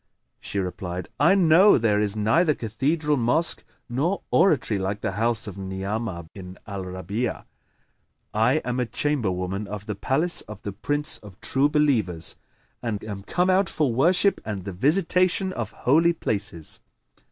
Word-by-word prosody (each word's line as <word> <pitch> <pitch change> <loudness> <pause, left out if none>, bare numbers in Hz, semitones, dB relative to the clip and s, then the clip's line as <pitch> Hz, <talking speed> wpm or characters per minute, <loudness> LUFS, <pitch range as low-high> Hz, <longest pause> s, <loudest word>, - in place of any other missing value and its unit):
She - - -6
replied, 90 -1 -4
"I 170 +7 +5
know 185 +2 +6
there 110 -3 +2
is 105 -1 +1
neither 120 +10 +2
cathedral 145 +7 0
mosque 125 +8 +1 0.2
nor 145 +11 -1
oratory 135 - +3
like 100 +2 -3
the - - -1
house 115 +3 +1
of 100 -2 -7
Ni'amah 95 -1 -4
bin 95 -2 -10
al 100 -3 -6
Rabi'a. 95 +6 -4 0.9
I - - +3
am 125 +1 -2
a 125 - 0
chamberwoman 100 -9 -1
of 105 0 -7
the 105 - -3
palace 140 - +1
of 105 -1 -10
the 100 - -5
Prince 145 +8 +1
of 100 -3 -14
True 140 +2 +1
Believers 115 - +1 0.5
and 110 -4 -3
am 100 -2 -6
come 180 - +1
out 185 0 +2
for 145 -6 0
worship 175 - +3
and 105 -3 -5
the 100 - -5
visitation 180 - +2
of 115 -3 -4
Holy 165 +9 +2
Places." 100 - -3
115 Hz, 150 wpm, -24 LUFS, 100-150 Hz, 0.9 s, know